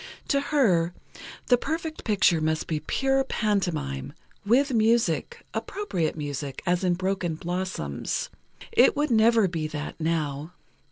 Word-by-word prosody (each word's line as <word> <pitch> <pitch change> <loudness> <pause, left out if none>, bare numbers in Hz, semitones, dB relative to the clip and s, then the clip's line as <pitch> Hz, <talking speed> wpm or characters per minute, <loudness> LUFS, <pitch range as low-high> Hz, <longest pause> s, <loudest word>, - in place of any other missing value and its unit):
To 280 -1 +3
her, 185 - +2 0.5
the 245 -1 +4
perfect 320 +1 -4
picture 190 -6 +3
must 155 0 0
be 155 -2 -2
pure 270 - +1
pantomime—with 205 - -1
music—appropriate 225 - 0
music, 145 -2 -5
as 180 0 +1
in 180 -1 +2
"Broken 185 -2 -1
Blossoms." 180 +3 -3 0.4
It 450 -1 +5
would 295 -2 +1
never 225 -2 +5
be 165 -3 -3
that, 150 +1 -6
now. 155 -1 -2
185 Hz, 115 wpm, -26 LUFS, 160-245 Hz, 0.5 s, It